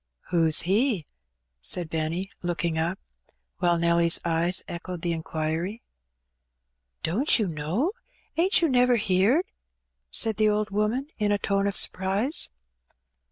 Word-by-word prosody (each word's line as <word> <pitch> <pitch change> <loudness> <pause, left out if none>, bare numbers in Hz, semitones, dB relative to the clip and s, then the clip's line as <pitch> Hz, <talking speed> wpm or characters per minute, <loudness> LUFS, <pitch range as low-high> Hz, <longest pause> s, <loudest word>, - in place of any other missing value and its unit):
"Who's 165 -3 +4
He?" 200 - +1 0.6
said 165 - +1
Benny, 165 +4 -3
looking 170 -2 -2
up; 170 +4 -1 0.6
while 175 -1 +2
Nelly's 170 0 +3
eyes 170 +2 +1
echoed 175 0 -6
the 175 - 0
inquiry. 160 +6 -3 1.2
"Don't 220 - +3
you 220 - 0
know 170 - -1 0.2
— - - -38
ain't 355 +2 +3
you - - +5
never 250 -2 +4
heerd?" 205 - +2 0.6
said 225 -2 +1
the 215 0 +3
old 210 0 -1
woman, 215 +6 0
in 210 -1 +1
a 205 - +3
tone 200 0 0
of 200 - -2
surprise. 195 - +1
185 Hz, 130 wpm, -26 LUFS, 170-215 Hz, 1.2 s, you